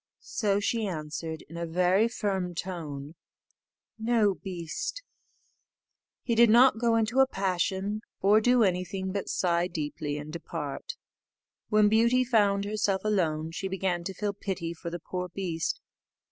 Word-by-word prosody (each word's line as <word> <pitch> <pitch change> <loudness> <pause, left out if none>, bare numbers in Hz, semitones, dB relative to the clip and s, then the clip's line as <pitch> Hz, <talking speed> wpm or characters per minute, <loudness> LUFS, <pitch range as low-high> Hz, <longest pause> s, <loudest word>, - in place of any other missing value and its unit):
So 200 -2 0
she 220 +1 0
answered, 160 -1 -5
in 165 - -9
a 170 0 -3
very 180 +6 +3
firm 190 -6 -2
tone, 155 -5 -5 0.9
"No, 220 -3 +3
beast." 180 - -5 1.2
He 235 - 0
did 235 0 +6
not 240 +1 +6
go 230 -1 +3
into 230 +3 +1
a 265 - +7
passion, 195 0 -1 0.2
or 210 +3 +5
do 245 +1 +4
anything 190 0 -1
but 200 0 -3
sigh 175 -1 +1
deeply, 150 -3 -4
and 150 +1 -7
depart. 485 - -5 0.7
When 215 -1 +5
Beauty 235 +4 +4
found 205 -5 +2
herself 205 -2 0
alone, 165 -6 0
she 190 +3 -3
began 190 -2 -1
to 195 - -3
feel 205 -1 -2
pity 190 -4 -4
for 170 0 -6
the 175 - -4
poor 180 +1 -4
beast. 170 -3 -2
190 Hz, 145 wpm, -28 LUFS, 170-215 Hz, 1.2 s, a